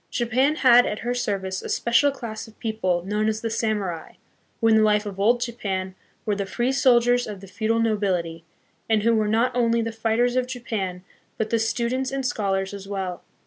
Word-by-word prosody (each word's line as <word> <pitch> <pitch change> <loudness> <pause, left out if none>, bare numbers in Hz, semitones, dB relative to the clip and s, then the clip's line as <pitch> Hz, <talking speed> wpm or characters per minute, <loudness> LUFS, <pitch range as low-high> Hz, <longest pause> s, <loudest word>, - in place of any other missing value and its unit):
Japan 255 +5 +1
had 245 -4 +6
at 210 - -2
her 245 - 0
service 195 -6 -2
a - - -7
special 235 +5 +3
class 230 -6 -6
of 220 - -17
people 185 -6 -1
known 210 +2 0
as 220 0 -2
the 225 -1 -3
samurai, 210 -7 -2 0.5
who, 225 - +2
in 220 -1 +5
the - - +5
life 210 0 +3
of 195 -2 -6
Old 235 +5 +3
Japan, 195 -6 -3 0.3
were 210 - +1
the 200 -1 -3
free 240 +5 0
soldiers 245 -2 +3
of 205 -2 -7
the 195 - -11
feudal 220 +4 -1
nobility, 185 -7 -1 0.5
and 220 -2 +2
who 230 +1 +3
were 215 -1 +2
not 230 +4 +1
only 235 -1 +2
the 230 - -3
fighters 225 +2 0
of 255 -1 +1
Japan, 210 -8 -4 0.3
but 220 -1 -2
the 230 - +2
students 245 +3 -1
and 270 -1 -3
scholars 195 -4 -1
as 200 -1 -8
well. 190 -3 -4
220 Hz, 200 wpm, -24 LUFS, 200-240 Hz, 0.5 s, had